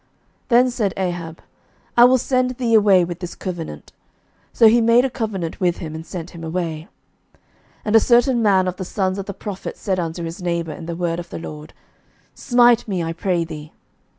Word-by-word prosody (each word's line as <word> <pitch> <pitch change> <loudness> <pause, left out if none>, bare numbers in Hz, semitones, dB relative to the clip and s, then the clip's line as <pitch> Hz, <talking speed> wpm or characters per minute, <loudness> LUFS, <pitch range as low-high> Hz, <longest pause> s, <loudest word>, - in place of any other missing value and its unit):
Then 250 +1 +4
said 210 -6 -1
Ahab, 175 -3 -4 0.5
I 240 - +8
will 255 +1 +5
send 255 0 0
thee 235 -3 0
away 200 -5 +5
with 175 0 -6
this 175 -2 -7
covenant. 170 - -7 0.6
So 225 - +5
he 235 +2 +5
made 230 +2 +4
a 265 - -2
covenant 205 -9 -4
with 175 -3 +1
him, 155 -3 -7
and 160 0 -6
sent 175 0 -7
him 170 -2 -10
away. 160 -1 -4 0.5
11:020:035 - - -34 0.5
And 210 - +1
a - - +9
certain 240 +2 +3
man 190 -4 +3
of 180 0 -3
the - - -4
sons 190 0 -2
of 195 - -6
the 200 - -4
prophets 200 -3 -7
said 190 -3 -1
unto 170 0 -4
his 165 +3 -6
neighbour 170 -2 -2
in 165 +2 -9
the 170 - -4
word 170 -1 -2
of 170 -1 -8
the - - -6
LORD, 150 -2 -9 0.6
Smite 240 -2 +3
me, 185 -5 -2
I 165 0 -3
pray 175 -1 -1
thee. 155 -2 -9
185 Hz, 205 wpm, -21 LUFS, 170-225 Hz, 0.6 s, a